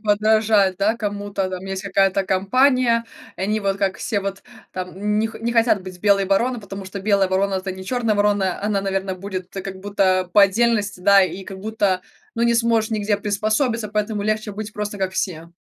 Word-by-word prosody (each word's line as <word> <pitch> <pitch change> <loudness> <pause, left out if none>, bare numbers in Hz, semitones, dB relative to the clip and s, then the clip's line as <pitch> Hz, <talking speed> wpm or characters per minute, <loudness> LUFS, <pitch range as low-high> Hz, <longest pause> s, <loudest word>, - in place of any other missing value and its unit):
подражать, 210 -2 +3
да, 215 +3 +2
кому-то 205 -3 -3
там. 185 0 -6
Есть 195 0 -4
какая-то 195 -1 +2
компания, 230 +5 +2 0.3
и - - -10
они 210 +2 0
вот, 195 -2 -1
как 195 -1 -1
все, 205 -4 -1
вот 195 0 -5 0.3
там 190 +3 -2
них 220 +1 -1
не 235 +1 -1
хотят 230 -4 +3
быть 185 -1 -9
белой 200 -1 +3
вороной, 235 +6 +1
потому 200 -1 -8
что 190 +1 -7
белая 195 -1 +2
ворона- 195 +1 +1
это 190 0 -3
не 190 0 -9
чёрная 230 0 0
ворона, 205 -3 +1
она, 205 -1 0
наверно, 195 -1 -2
будет 185 -1 -6
как 195 -1 -6
будто 190 -2 +1
по 205 - +7
отдельности, 210 -1 +2
да, 200 +1 +6
и 185 +2 -5
как 190 0 -9
будто 200 -3 0 0.3
ну, 230 - 0
не 235 0 +3
сможешь 230 -1 +2
нигде 210 -1 0
приспособиться, 215 +3 -1
поэтому 210 0 -2
легче 215 0 -1
быть 210 +1 -6
просто, 210 -1 -4
как 190 -1 -1
все. 170 -3 -3
200 Hz, 190 wpm, -21 LUFS, 190-215 Hz, 0.3 s, по